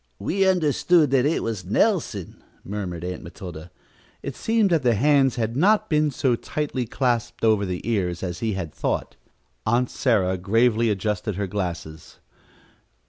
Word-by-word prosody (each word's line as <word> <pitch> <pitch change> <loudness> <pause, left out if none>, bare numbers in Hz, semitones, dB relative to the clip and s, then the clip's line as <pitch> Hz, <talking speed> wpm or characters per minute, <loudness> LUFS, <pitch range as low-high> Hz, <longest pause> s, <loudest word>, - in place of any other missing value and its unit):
"We 190 - +1
understood 165 -3 +3
that 135 0 +3
it 160 - 0
was 110 -5 -3
Nelson," - - 0 0.2
murmured 95 -4 -5
Aunt 90 0 -4
Matilda. 85 -1 -9 0.5
It 140 - -5
seemed 220 -4 +1
that 165 -3 +3
the 120 -3 +3
hands 135 +2 +3
had 115 -1 -2
not 210 +7 +3
been 150 0 +3
so 130 -2 +1
tightly 130 -1 -3
clasped 120 -1 -1
over 105 -3 +3
the 90 +3 -4
ears 90 -7 -1
as 90 -2 -4
he 110 -2 -1
had 85 -6 -5
thought. - - -2 0.5
Aunt 120 +3 +1
Sarah 95 -8 +1
gravely 115 +4 +2
adjusted 105 0 -1
her 100 +1 -2
glasses. 90 -5 -5
115 Hz, 150 wpm, -24 LUFS, 95-140 Hz, 0.5 s, understood